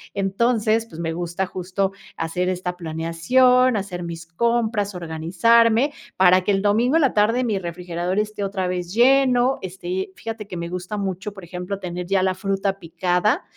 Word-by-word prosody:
Entonces, 220 +3 +1
pues, 165 - -11
me 165 -1 -2
gusta 175 +2 -2
justo 190 +2 -2 0.3
hacer 180 +3 -1
esta 180 -1 -3
planeación, 180 +10 +2
hacer 185 -3 -4
mis 165 -1 -6
compras, 215 +1 0
organizarme, 225 - +2 0.2
para 185 0 +6
que 205 - 0
el 195 0 +1
domingo 230 +8 +2
en 330 - +5
la 270 - +2
tarde 225 +4 +2
mi 210 -5 0
refrigerador 175 +1 -4
esté 210 -1 -2
otra 190 -2 -2
vez 180 0 -3
lleno. 255 0 +4
Esté 190 0 -4
fíjate 225 -2 -6
que 180 - -7
me 170 0 -4
gusta 180 +3 -5
mucho, 195 +1 -4
por 195 -3 -11
ejemplo, 180 +3 -5
tener 180 -1 -5
ya 195 -1 +2
la 190 -1 +2
fruta 195 0 -1
picada. 180 +4 0
190 Hz, 170 wpm, -22 LUFS, 180-220 Hz, 0.3 s, para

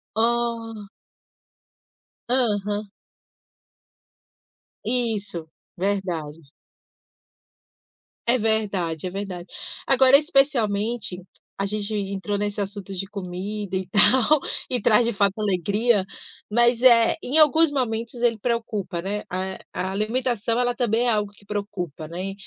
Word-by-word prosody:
Oh. 230 -2 -1 1.4
Aham. 210 -4 +1 2.0
Isso. 210 -8 0 0.3
Verdade. 175 -5 -2 1.9
É 240 +2 +5
verdade, 200 -8 -1
é - - -3
verdade. 185 -2 -6 0.4
Agora, 265 +1 +6
especialmente, 235 - 0 0.4
a 195 - -1
gente 210 +1 -2
entrou 200 0 -2
nesse 205 0 -2
assunto 200 -1 -6
de 190 +1 -3
comida 195 +1 -5
e 190 0 -2
tal, 245 +9 +5 0.3
e 250 -3 +1
traz 230 +3 +4
de 235 - 0
fato 200 -2 +1
alegria. 205 +2 +1 0.4
Mas, 240 +2 +3
eh, 235 -3 +5
em 275 +5 0
alguns 320 +1 +6
momentos 235 -4 -2
ele 235 -2 +2
preocupa, 215 -6 -2
né. 205 +3 -3
A 190 +1 -4
a 190 - -2
alimentação 230 +2 -1
ela 245 0 +1
também 240 -1 +1
é - - +3
algo 210 -2 -1
que 205 - -20
preocupa, 185 -7 -5
né. 185 +4 -5
210 Hz, 110 wpm, -23 LUFS, 195-235 Hz, 2.0 s, Agora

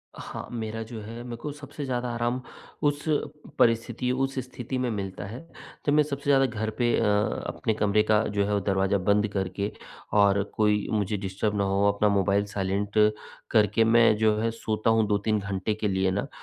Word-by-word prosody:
हाँ, - - -7
मेरा 115 -1 -4
जो 110 -1 -8
है 115 +3 -8
मेरे 120 -1 -6
को 150 - -4
सबसे 145 0 -8
ज़्यादा 125 -1 -2
आराम 120 +2 -1 0.4
उस, 145 0 +1 0.6
परिस्थिति 120 +2 +2
उस 135 +1 -1
स्थिति 125 0 -5
में 125 -1 0
मिलता 95 -2 -4
है, 115 +5 -7 0.5
जब 145 - +3
मैं 150 0 +5
सबसे 140 -1 -5
ज़्यादा 135 -1 +5
घर 110 -2 -2
पे 120 -2 +2
अ, - - +1 0.4
अपने 110 - -1
कमरे 105 0 +2
का 105 0 +3 0.2
जो 100 - +3
हैं 105 - -2
अ, 100 - +2
दरवाज़ा 95 0 +1
बंद 105 +3 +2
करके 95 +1 -2 0.5
और 100 -1 +5
कोई 105 -1 +2
मुझे 105 -1 0
डिस्टर्ब 100 +2 -2
ना 100 - +2
हो, 100 +1 +1
अपना 105 +1 +2
मोबाइल 100 0 +2
साइलेंट 100 +1 -2 0.6
करके 110 0 +4
मैं 115 -1 +5
जो 110 -1 +3
है 115 +1 0
सोता 110 0 -1
हूँ, 110 -2 +3
2-3 105 +1 +1
घंटे 100 +1 -2
के 105 0 -2
लिए 95 -1 +1
ना, 100 +8 -2
110 Hz, 190 wpm, -26 LUFS, 100-120 Hz, 0.6 s, मैं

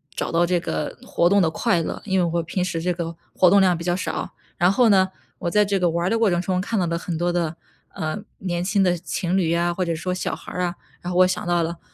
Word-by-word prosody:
找 - - -2
到 170 +1 +3
这 175 0 +1
个 80 - -4
活 170 - +1
动 200 +2 +4
的 165 - +3
快 165 +1 +1
乐， - - -4
因 190 -2 +1
为 180 - +3
我 170 - +1
平 170 +3 -2
时 175 -2 -2
这 180 +2 0
个 170 -1 -5 0.2
活 180 - +5
动 200 +2 +6
量 185 -2 +4
比 170 - -6
较 175 0 +1
少， 185 - -4 0.2
然 175 +2 +3
后 240 +2 +4
呢， 190 -2 +4 0.3
我 170 - -2
在 210 +3 +3
这 200 -1 0
个 180 -1 +2
玩 170 +1 -1
儿 - - +2
的 230 - +1
过 225 -2 +4
程 175 -1 +1
中 180 +1 0
看 215 +2 -1
到 180 - +1
的 170 - -1
很 170 -2 -4
多 175 +1 0
的， 170 -2 -1 0.3
呃， 155 +5 -4 0.2
年 175 -2 -2
轻 200 +1 +2
的 180 -1 +3
情 175 +2 -2
侣 170 -4 +2
啊， 175 0 +1
或 185 - -1
者 170 -2 -1
说 180 +3 -3
小 180 - -2
孩 - - -11
儿 180 - -3
啊， 175 0 -1 0.3
然 180 - -4
后 175 - -1
我 - - +8
想 185 -1 -2
到 175 -1 +2
了， 170 +1 -4
175 Hz, 305 characters per minute, -23 LUFS, 170-185 Hz, 0.3 s, 我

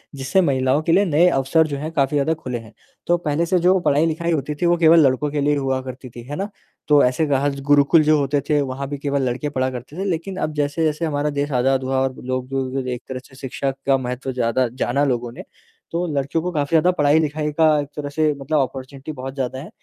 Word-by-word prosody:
जिससे 140 +8 +1
महिलाओं 135 -1 +1
के 165 - +1
लिए 200 +4 +4
नए 170 +2 +4
अवसर 155 +3 +2
जो 140 -2 -4
हैं, 155 +3 -5
काफ़ी 145 -1 +1
ज़्यादा 145 +3 +2
खुले 130 -6 -5
हैं। 110 0 -14 0.3
तो 175 0 +3
पहले 160 0 -1
से 180 +1 +2
जो 185 +2 +4
पढ़ाई-लिखाई 165 +2 +1
होती 150 -1 -1
थी, 175 - -2
वो 175 0 +3
केवल 165 0 +6
लड़कों 140 +3 0
के 145 -1 -1
लिए 145 +1 +2
ही - - 0
हुआ 135 -1 -1
करती 130 0 -9
थी, 120 0 -11
है 145 - -5
ना? 200 +4 -3 0.4
तो 145 -1 +5
ऐसे 125 +5 +2
गह 140 0 +1
ज़ 140 0 -6
गुरुकुल 145 +3 +5
जो 155 0 +4
होते 140 0 0
थे 150 -1 +3
वहाँ 135 0 -4
भी 145 - -4
केवल 140 0 -1
लड़के 130 +4 -3
पढ़ा 130 -2 -1
करते 125 +6 -9
थे। 195 - -2
लेकिन 185 +1 -3
अब 155 - -2
जैसे-जैसे 150 +2 0
हमारा 150 -1 -1
देश 145 +1 -1
आज़ाद 130 +1 +1
हुआ 130 0 0
और 130 -1 -1
लोग 130 0 -3
जो 135 -1 -2
ग 130 - -7
एक 125 0 -3
तरह 130 -1 -4
से 130 - -17
शिक्षा 135 +1 -3
का 135 -1 +4
महत्व 125 +1 -4
ज़्यादा 125 +1 +1 0.2
जाना 140 +4 +1
लोगों 120 -3 -1
ने, - - -10 0.5
तो 170 +2 -1
लड़कियों 140 +3 -1
को 180 - -2
काफ़ी 145 -3 -1
ज़्यादा 165 +2 +4
पढ़ाई-लिखाई 150 +1 +2
का 160 - +5
एक 145 - -3
तरह 145 -1 -4
से 155 +1 +1
मतलब 150 +3 -1
ऑपर्च्युनिटी 135 +2 -4
बहुत 135 -2 -7
ज़्यादा 130 -1 -3
है। 150 - -9
145 Hz, 245 wpm, -21 LUFS, 130-155 Hz, 0.5 s, केवल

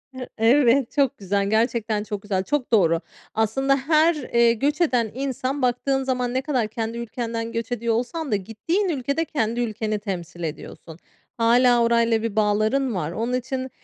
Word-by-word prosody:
Hı 255 -1 -6
Evet, 240 +2 +4
çok 275 -4 +1
güzel. 200 0 -1
Gerçekten 220 -1 0
çok 210 -1 -5
güzel, 195 -2 -1
çok 270 +3 -2
doğru. 170 -7 +3 0.3
Aslında 270 +6 +1
her, 310 +4 +3
ııı, 235 -5 +2
göç 285 +8 -1
eden 245 -9 +2
insan 265 +1 -3
baktığın 265 +2 +1
zaman 250 -2 -1
ne 260 - 0
kadar 260 -6 0
kendi 225 +1 -4
ülkenden 230 -1 -4
göç 230 +1 -4
ediyor 235 -1 0
olsan 265 +6 -3
da - - +3
gittiğin 225 - -2
ülkede 280 +1 -1
kendi 235 -6 -1
ülkeni 215 -2 -2
temsil 175 -4 -6
ediyorsun. 160 0 -7 0.4
Hâlâ 240 +1 +4
orayla 230 -1 +2
bir 225 -2 -3
bağların 215 +4 +1
var. 165 -3 -2
Onun 230 +7 -2
için 260 +1 -3
235 Hz, 165 wpm, -23 LUFS, 215-265 Hz, 0.4 s, Evet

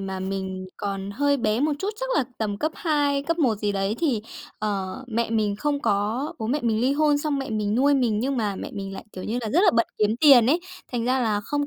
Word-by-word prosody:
mà 190 -1 -4
mình 190 -1 -4
còn 195 -1 -4
hơi 285 +6 +1
bé 220 -2 0
một 300 +2 +2
chút, 390 - -2
chắc - - -1
là 270 - +2
tầm 210 -2 -1
cấp 310 +6 -1
2, 290 -4 +1
cấp 335 +4 -1
1 255 -9 +3
gì 205 -1 -1
đấy 195 +1 0
thì, 260 -11 0 0.4
ờ, 200 -1 -2
mẹ 230 -1 -1
mình 210 -2 +1
không 290 +4 -1
có 215 +8 0
bố 220 - -3
mẹ 285 +6 0
mình 225 -2 +1
ly 260 +3 +2
hôn, 295 0 +3
xong 290 -1 -1
mẹ 270 - -4
mình 210 -1 -1
nuôi 280 +4 +4
mình, 235 -6 +1
nhưng 270 +3 -1
mà 210 -4 -1
mẹ - - -6
mình 195 -2 -5
lại, 190 - -8
kiểu 185 - -7
như 235 +3 -2
là, 220 -3 -4
rất 325 - +4
là 385 - +7
bận 230 0 +3
kiếm 215 +1 +2
tiền 270 -7 +8
ấy, 315 +7 +3 0.3
thành 240 -2 -1
ra 255 +2 +2
là 215 -4 +1
không 290 +7 -2
230 Hz, 255 wpm, -24 LUFS, 205-285 Hz, 0.4 s, tiền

